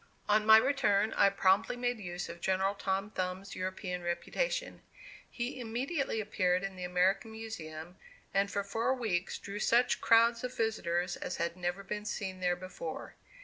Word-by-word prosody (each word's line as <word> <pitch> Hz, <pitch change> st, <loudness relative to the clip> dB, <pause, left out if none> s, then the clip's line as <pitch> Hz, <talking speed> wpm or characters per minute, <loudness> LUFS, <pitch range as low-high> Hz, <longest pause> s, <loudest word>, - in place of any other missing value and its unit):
On 210 Hz, +1 st, +3 dB
my 220 Hz, 0 st, +10 dB
return, 220 Hz, -5 st, +2 dB
I 200 Hz, -, +5 dB
promptly 195 Hz, +2 st, +3 dB
made 245 Hz, -1 st, -1 dB
use 180 Hz, -2 st, -5 dB
of 170 Hz, 0 st, -9 dB
General 190 Hz, +2 st, +1 dB
Tom 195 Hz, +1 st, -2 dB
Thumb's 185 Hz, 0 st, -4 dB
European 185 Hz, -1 st, -3 dB
reputation. -, -, -2 dB, 0.5 s
He 245 Hz, +2 st, -4 dB
immediately 250 Hz, +3 st, -2 dB
appeared 185 Hz, -3 st, +1 dB
in 195 Hz, -1 st, -4 dB
the 180 Hz, -, -7 dB
American 190 Hz, +5 st, +1 dB
Museum, 175 Hz, -6 st, -7 dB, 0.4 s
and 195 Hz, +1 st, +2 dB
for 200 Hz, 0 st, -1 dB
four 230 Hz, +6 st, 0 dB
weeks 190 Hz, -8 st, -1 dB
drew 200 Hz, +1 st, -6 dB
such 235 Hz, +3 st, +3 dB
crowds 230 Hz, +1 st, +5 dB
of 250 Hz, 0 st, -5 dB
visitors 175 Hz, -6 st, 0 dB
as -, -, -4 dB
had 170 Hz, 0 st, -1 dB
never 180 Hz, +2 st, -3 dB
been 210 Hz, +1 st, -5 dB
seen 190 Hz, -3 st, -4 dB
there 180 Hz, -1 st, +1 dB
before. 180 Hz, -3 st, -7 dB
195 Hz, 160 wpm, -32 LUFS, 180-225 Hz, 0.5 s, my